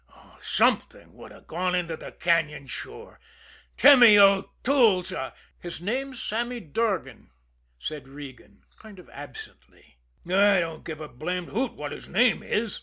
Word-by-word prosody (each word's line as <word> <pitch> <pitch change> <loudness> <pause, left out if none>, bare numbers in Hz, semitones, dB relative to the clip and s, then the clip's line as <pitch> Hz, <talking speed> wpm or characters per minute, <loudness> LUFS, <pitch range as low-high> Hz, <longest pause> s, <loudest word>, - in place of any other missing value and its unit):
Something - - 0
would - - -13
have - - -16
gone 180 +2 -2
into 170 -2 -2
the - - -10
cañon 160 -4 0
sure. - - -9 0.6
Timmy 245 -7 +8
O'Toole's 200 0 +3
a 130 -8 -5
" - - -35
"His 175 -2 -7
name's 255 +7 -3
Sammy 240 +3 -3
Durgan," 195 +3 -3 0.5
said 150 - -6
Regan, 135 -7 -12 0.2
kind 215 -3 -14
of 180 - -14
absently. 140 - -13 0.3
"I 195 +2 +4
don't 165 -2 -4
give 155 -2 -7
a 155 - -6
blamed 175 +7 -5
hoot 245 +4 -2
what 145 -1 -7
his - - -9
name 245 0 +3
is!" 215 0 -2
180 Hz, 145 wpm, -26 LUFS, 155-220 Hz, 0.6 s, Timmy